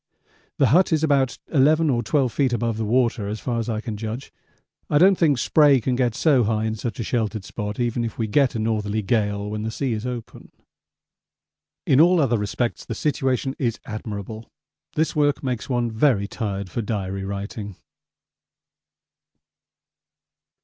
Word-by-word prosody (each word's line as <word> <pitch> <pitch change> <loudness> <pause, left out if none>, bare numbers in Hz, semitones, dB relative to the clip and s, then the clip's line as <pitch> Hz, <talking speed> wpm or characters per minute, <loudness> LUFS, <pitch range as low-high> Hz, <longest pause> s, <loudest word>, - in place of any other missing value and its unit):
The 135 - +4
hut 175 +9 +4
is 160 -1 +2
about 140 -4 +2 0.2
11 155 +2 +4
or 120 -2 +1
12 130 +1 0
feet 135 -4 +1
above 115 -2 -1
the 110 - -2
water 115 -2 +1
as 105 +1 -4
far 120 -2 -2
as 115 - -3
I 110 -1 -2
can 110 -3 -5
judge. 115 +5 -6 0.6
I 145 - +3
don't 190 +5 +6
think 155 -6 +2
spray 145 +1 +4
can 125 +2 -1
get 120 -3 0
so 140 -6 +3
high 110 0 0
in 110 - -1
such 110 0 -5
a - - -1
sheltered 110 -3 -2
spot 105 +2 -5
even 120 0 0
if 115 - -5
we 115 - 0
get 125 +5 +2
a - - 0
northerly 110 -1 -1
gale 105 -1 0
when 105 0 -3
the 110 - -2
sea 125 +2 -2
is 110 +3 -4
open. 120 -2 -7 1.3
In 135 +2 +5
all 175 +1 +5
other 120 -6 +2
respects 110 +3 -2
the 115 - -5
situation 135 -2 -1
is 120 -4 -1
admirable. 110 0 -6 0.5
This 160 +2 0
work 145 -2 +1
makes 125 -2 -3
one 120 -2 0
very 110 -3 +2
tired 100 -4 -4
for 120 - -2
Diary 100 -3 -3
writing. 100 0 -5
115 Hz, 170 wpm, -23 LUFS, 110-135 Hz, 1.3 s, don't